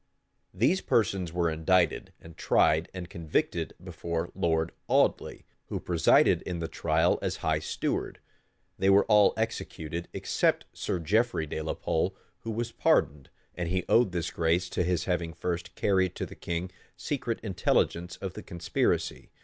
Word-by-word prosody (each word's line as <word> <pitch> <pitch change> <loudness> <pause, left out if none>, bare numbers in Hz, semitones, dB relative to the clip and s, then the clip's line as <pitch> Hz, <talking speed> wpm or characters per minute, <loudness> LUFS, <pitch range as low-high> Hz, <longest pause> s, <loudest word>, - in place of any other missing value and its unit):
These 125 - +2
persons 95 -6 +1
were 85 0 +1
indicted, 80 +1 +1
and 80 -1 -13
tried, 80 +2 +2
and 90 -2 -7
convicted, 85 -3 -2
before 85 -1 -4
Lord 80 -3 0 0.2
Audley, - - +1 0.2
who - - -3
presided 85 -2 +4
in 90 - -4
the 85 -1 -3
trial 80 +1 +1
as - - -1
high - - +2
steward; - - -3 0.6
they 95 - +3
were 100 +1 +6
all 105 -2 +5
executed, 85 -7 -3
except - - 0
Sir - - -2
Geoffrey 100 +2 +1
de 80 +1 -4
la 80 - -3
Pole, 90 +4 -1 0.2
who 115 - -7
was 115 +1 -2
pardoned; 70 - +1 0.2
and 90 -2 -3
he 90 0 -1
owed 115 -5 +4
this 85 -1 -2
grace 85 +2 +1
to - - -1
his 90 0 0
having 85 -2 -1
first 90 +1 -4
carried 95 -3 +1
to - - -3
the - - -10
king 85 +2 -4 0.3
secret 125 -6 -3
intelligence 90 -3 0
of 95 -2 -6
the - - -7
conspiracy. 85 -1 -1
90 Hz, 155 wpm, -28 LUFS, 80-95 Hz, 0.6 s, were